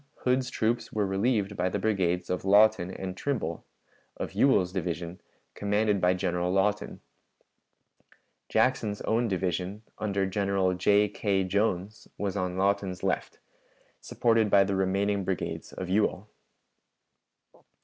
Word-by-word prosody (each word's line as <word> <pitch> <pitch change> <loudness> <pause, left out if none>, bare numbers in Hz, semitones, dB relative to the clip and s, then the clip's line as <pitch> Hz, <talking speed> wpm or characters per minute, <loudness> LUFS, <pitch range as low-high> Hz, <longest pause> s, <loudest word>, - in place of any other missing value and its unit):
Hood's 130 0 +1
troops 115 -1 -1
were 105 -1 0
relieved 100 +1 0
by 90 0 0
the 95 - -2
brigades 90 -4 0
of 90 - -2
Lawton 100 -1 +4
and 95 0 -6
Trimble, 95 - -3 0.5
of - - -4
Ewell's 95 -10 +3
division, 85 -1 -4 0.3
commanded 105 -1 0
by 90 +1 +3
General 90 -1 -1
Lawton. 100 +2 0 1.5
Jackson's 110 -5 +1
own 115 +2 +1
division, 95 +1 -2 0.2
under 100 -2 0
General 95 -1 0
J. 100 +3 +3
K. 100 -1 0
Jones, 100 +1 -1
was 100 -1 -2
on 90 -2 -2
Lawton's 95 -1 0
left, 95 -1 -2 0.6
supported 115 -2 +1
by 100 0 +6
the 100 0 -1
remaining 100 +1 0
brigades 95 -1 -4
of 95 - -6
Ewell. 105 +1 0
100 Hz, 125 wpm, -28 LUFS, 95-105 Hz, 1.5 s, by